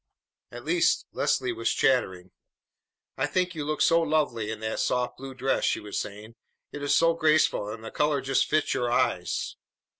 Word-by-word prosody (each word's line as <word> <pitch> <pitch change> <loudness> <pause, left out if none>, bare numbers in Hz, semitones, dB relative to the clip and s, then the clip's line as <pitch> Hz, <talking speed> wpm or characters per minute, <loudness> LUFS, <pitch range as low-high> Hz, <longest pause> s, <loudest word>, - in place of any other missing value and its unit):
At - - -10
least, 355 0 +2
Leslie 375 -1 0
was - - -1
chattering. 95 -10 +1 0.9
"I 135 - 0
think 180 +3 0
you 155 -3 -4
look 150 +1 -2
so 165 0 +4
lovely 150 -9 0
in 110 -1 -4
that 110 0 -3
soft 125 -1 0
blue 135 0 -8
dress!" 135 +1 0
she - - +1
was 105 -1 -4
saying. 105 +2 -7 0.4
"It 145 - -7
is 145 - +2
so 165 0 +4
graceful, 155 -9 +2
and 110 +1 -7
the - - -7
color 150 -1 +1
just 135 0 +1
fits 155 0 +1
your 120 -1 -1
eyes." 120 - 0
135 Hz, 180 wpm, -27 LUFS, 115-155 Hz, 0.9 s, so